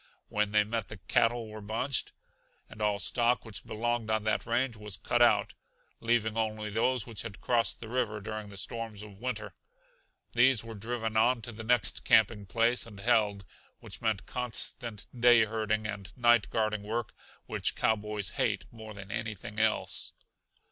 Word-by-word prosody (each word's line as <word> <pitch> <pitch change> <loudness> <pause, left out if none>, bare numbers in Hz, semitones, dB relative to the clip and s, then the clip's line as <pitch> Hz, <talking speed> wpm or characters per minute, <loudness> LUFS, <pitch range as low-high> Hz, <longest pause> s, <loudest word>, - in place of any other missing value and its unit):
When 105 -1 +1
they 105 0 +4
met 110 -1 -3
the 105 - -8
cattle 115 +5 +1
were 110 0 -8
bunched, 115 +6 -1 0.6
and 110 - -11
all 105 -1 +2
stock 120 +6 +1
which 110 -3 -6
belonged 120 0 -1
on 110 -1 +1
that 110 +1 0
range 120 +1 +1
was 105 -2 -5
cut - - 0
out, - - +4 0.5
leaving 115 -2 +1
only 110 -1 -1
those 120 +2 +1
which 110 -6 -4
had 100 - -7
crossed 120 -2 +2
the 115 - -8
river 115 -3 -1
during 110 0 -6
the 100 - -10
storms 110 0 -4
of 100 -2 -12
winter. 125 +2 -4 0.8
These 120 -1 +5
were 115 -1 -8
driven 110 +1 -3
on 115 +1 +3
to 120 - -5
the 110 0 -8
next 120 -1 +2
camping 105 -2 +4
place 115 +5 +2
and 105 -3 -11
held, 105 -3 +2 0.3
which - - -9
meant 110 -4 0
constant 120 -2 -4
day 120 -1 +6
herding 110 0 -1
and 100 -3 -5
night 120 -3 +4
guarding 110 -2 0
work 110 +2 -3 0.3
which - - -1
cowboys 105 -2 0
hate - - 0
more 110 -2 -10
than 100 0 -9
anything 110 -1 -4
else. 110 0 +1
110 Hz, 170 wpm, -30 LUFS, 105-120 Hz, 0.8 s, day